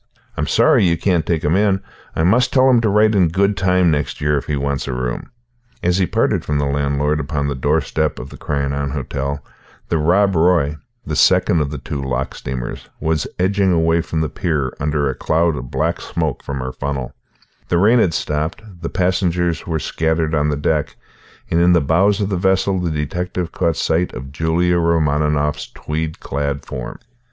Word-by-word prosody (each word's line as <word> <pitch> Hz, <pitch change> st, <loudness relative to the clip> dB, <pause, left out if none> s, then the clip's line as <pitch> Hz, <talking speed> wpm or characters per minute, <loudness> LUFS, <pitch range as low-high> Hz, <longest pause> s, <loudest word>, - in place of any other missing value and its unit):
I'm -, -, -2 dB
sorry -, -, +4 dB
you 85 Hz, -1 st, +2 dB
can't 90 Hz, -2 st, +1 dB
take 80 Hz, -2 st, 0 dB
him 75 Hz, +4 st, +2 dB
in. 100 Hz, -1 st, +2 dB, 0.4 s
I 80 Hz, -, +1 dB
must 125 Hz, +8 st, +3 dB
tell 130 Hz, -1 st, +4 dB
him 120 Hz, -2 st, +4 dB
to 110 Hz, -, +1 dB
write 105 Hz, +2 st, +4 dB
in 95 Hz, -4 st, +4 dB
good 100 Hz, +5 st, +1 dB
time 90 Hz, -1 st, +3 dB
next 75 Hz, -2 st, -2 dB
year 75 Hz, 0 st, +1 dB
if 70 Hz, -, -2 dB
he 75 Hz, -, 0 dB
wants 70 Hz, 0 st, -2 dB
a 65 Hz, -, -2 dB
room." 60 Hz, -1 st, -3 dB, 0.5 s
As 90 Hz, +2 st, +2 dB
he 90 Hz, -, +2 dB
parted -, -, +1 dB
from 75 Hz, -, -1 dB
the 70 Hz, -, 0 dB
landlord 70 Hz, +1 st, 0 dB
upon 70 Hz, 0 st, -2 dB
the 70 Hz, -, -1 dB
doorstep 75 Hz, +2 st, 0 dB
of 65 Hz, -, -8 dB
the -, -, -10 dB
Crianan 70 Hz, -1 st, -2 dB
Hotel, 70 Hz, 0 st, -3 dB, 0.4 s
the 80 Hz, -, +1 dB
Rob 95 Hz, +5 st, +3 dB
Roy 80 Hz, -3 st, +3 dB, 0.3 s
the -, -, -3 dB
second 85 Hz, -, +4 dB
of 70 Hz, -, -1 dB
the 75 Hz, -, -5 dB
two 70 Hz, +1 st, -5 dB
loch 65 Hz, 0 st, -2 dB
steamers 60 Hz, -2 st, -6 dB
was 80 Hz, -1 st, 0 dB
edging 95 Hz, +1 st, +2 dB
away 80 Hz, 0 st, +2 dB
from 80 Hz, -1 st, -2 dB
the 80 Hz, -, 0 dB
pier, 75 Hz, -8 st, -1 dB
under 75 Hz, 0 st, 0 dB
a 65 Hz, -, -1 dB
cloud 80 Hz, +4 st, +1 dB
of 60 Hz, -2 st, -6 dB
black 80 Hz, +6 st, -1 dB
smoke 80 Hz, -6 st, -2 dB
from 70 Hz, -1 st, -5 dB
her 65 Hz, 0 st, -4 dB
funnel 70 Hz, -3 st, -4 dB, 0.5 s
The 85 Hz, -, +1 dB
rain 110 Hz, +7 st, +5 dB
had 85 Hz, -7 st, +2 dB
stopped; 80 Hz, +6 st, -2 dB, 0.2 s
the 85 Hz, -, -3 dB
passengers 90 Hz, -2 st, 0 dB
were 80 Hz, -2 st, 0 dB
scattered 80 Hz, +1 st, -1 dB
on 75 Hz, -1 st, +2 dB
the 75 Hz, -, -1 dB
deck, 75 Hz, 0 st, -1 dB, 0.6 s
and 85 Hz, -, +3 dB
in 90 Hz, +1 st, +5 dB
the 85 Hz, -, +5 dB
bows 95 Hz, +8 st, +2 dB
of 100 Hz, -1 st, -1 dB
the 95 Hz, -, -1 dB
vessel 95 Hz, +1 st, +1 dB
the 90 Hz, -1 st, -1 dB
detective 85 Hz, +3 st, -3 dB
caught 85 Hz, -1 st, 0 dB
sight 85 Hz, +3 st, 0 dB
of 65 Hz, +1 st, -7 dB
Julia 85 Hz, +4 st, +1 dB
Romaninov's 75 Hz, -3 st, +1 dB
tweed 80 Hz, +1 st, -4 dB
clad 70 Hz, 0 st, -3 dB
form. -, -, -6 dB
80 Hz, 195 wpm, -19 LUFS, 70-90 Hz, 0.6 s, rain